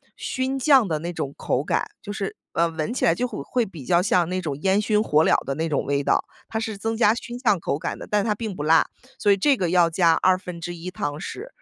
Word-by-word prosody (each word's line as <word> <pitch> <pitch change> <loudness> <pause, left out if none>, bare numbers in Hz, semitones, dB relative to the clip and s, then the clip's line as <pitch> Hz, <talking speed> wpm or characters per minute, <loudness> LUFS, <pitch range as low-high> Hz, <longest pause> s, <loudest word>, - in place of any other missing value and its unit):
熏 260 +1 -2
酱 265 -4 +5
的 155 -3 -1
那 170 +3 -4
种 140 -5 -4
口 125 - 0
感， 150 - 0 0.2
就 205 - -6
是， 200 -2 -4 0.2
呃， 170 0 +2
闻 160 +6 -3
起 - - -3
来 - - +5
就 250 +9 -1
会 190 - -6
会 245 - 0
比 170 -8 -10
较 170 +6 +3
像 180 -3 +2
那 185 0 -2
种 150 -5 -3
烟 195 +3 +3
熏 210 0 +2
火 155 -5 +3
燎 - - +4
的 135 - -3
那 160 +3 -1
种 150 -4 0
味 140 0 0
道。 - - +2 0.2
它 220 - -4
是 220 -3 -4
增 225 +3 -2
加 220 -2 +4
熏 240 +1 -6
酱 220 -7 +2
口 145 - -2
感 - - -4
的， - - -8
但 210 -1 +2
它 215 0 +1
并 210 -2 -5
不 145 - -4
辣， 160 +2 +5 0.3
所 205 - +1
以 200 - +7
这 270 +8 +3
个 180 -5 0
要 175 -1 +4
加 165 0 +4
1/2 175 -1 -1
汤 145 -5 -3
匙。 400 - -7
185 Hz, 270 characters per minute, -24 LUFS, 165-220 Hz, 0.3 s, 以